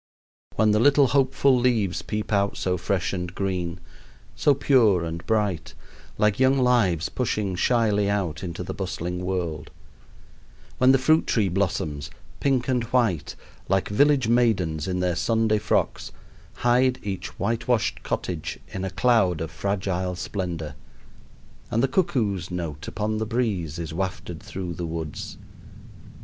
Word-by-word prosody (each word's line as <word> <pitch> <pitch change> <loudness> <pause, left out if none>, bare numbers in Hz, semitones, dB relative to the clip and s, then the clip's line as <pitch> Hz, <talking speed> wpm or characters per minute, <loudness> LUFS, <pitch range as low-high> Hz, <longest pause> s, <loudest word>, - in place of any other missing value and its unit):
When 110 0 +3
the 105 - +3
little 140 +2 +5
hopeful 135 0 +3
leaves 120 -7 +1
peep 105 0 -4
out 100 0 +1
so 90 -1 0
fresh 95 +2 -1
and 90 -1 -4
green, 90 -3 -2 0.6
so 145 - +3
pure 115 -11 +3
and 85 0 -5
bright, 105 -7 0 0.4
like 105 0 +2
young 130 +1 +4
lives 115 - +2
pushing 105 -6 -2
shyly 105 -1 +2
out 95 -5 -1
into 90 0 -5
the - - -5
bustling 90 -2 -4
world; 85 -5 -3 1.1
when 130 +1 +6
the 135 - +5
fruit 155 +5 +3
tree 105 -5 +2
blossoms, 90 -6 -1 0.3
pink 135 -3 +1
and 125 -3 +1
white, 115 - 0 0.3
like 95 0 +1
village 140 +3 +3
maidens 95 -10 +1
in 90 -1 -1
their 90 -1 +1
Sunday 110 +1 +1
frocks, - - -1 0.4
hide 125 +1 +3
each 95 -2 -5
whitewashed 115 0 0
cottage 85 -4 -3
in 95 - -5
a 95 - -2
cloud 95 -5 +2
of 80 0 -4
fragile 95 +1 -2
splendor; 85 -6 -4 1.0
and 115 +2 +1
the - - +4
cuckoo's 110 - 0
note 85 -4 -5
upon 110 0 -2
the 110 - -2
breeze 100 - -1
is 85 -2 -5
wafted 90 -2 -4
through 90 -2 -5
the 85 0 -4
woods! 80 -2 -5
100 Hz, 140 wpm, -25 LUFS, 90-120 Hz, 1.1 s, when